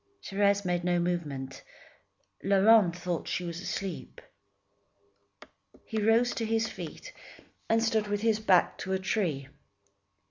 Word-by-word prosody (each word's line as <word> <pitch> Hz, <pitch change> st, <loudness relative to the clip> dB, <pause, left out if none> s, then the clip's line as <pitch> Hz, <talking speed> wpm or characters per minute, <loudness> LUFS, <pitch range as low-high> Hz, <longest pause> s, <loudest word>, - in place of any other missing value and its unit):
Thérèse 200 Hz, 0 st, +1 dB
made 175 Hz, -1 st, 0 dB
no 175 Hz, 0 st, +1 dB
movement. 150 Hz, -7 st, -3 dB, 0.8 s
Laurent 195 Hz, -2 st, +4 dB
thought 175 Hz, -2 st, -3 dB
she 180 Hz, -, -2 dB
was 170 Hz, 0 st, -5 dB
asleep. 180 Hz, -9 st, -5 dB, 1.7 s
He 220 Hz, -1 st, -3 dB
rose 230 Hz, +3 st, +3 dB
to 230 Hz, -, -3 dB
his 225 Hz, 0 st, +1 dB
feet -, -, -9 dB, 0.6 s
and 225 Hz, 0 st, +3 dB
stood 220 Hz, -2 st, +1 dB
with 205 Hz, 0 st, -2 dB
his 220 Hz, -1 st, +2 dB
back 190 Hz, -5 st, +3 dB
to 190 Hz, -, -3 dB
a -, -, +2 dB
tree. 180 Hz, -8 st, -1 dB
195 Hz, 130 wpm, -29 LUFS, 175-220 Hz, 1.7 s, Laurent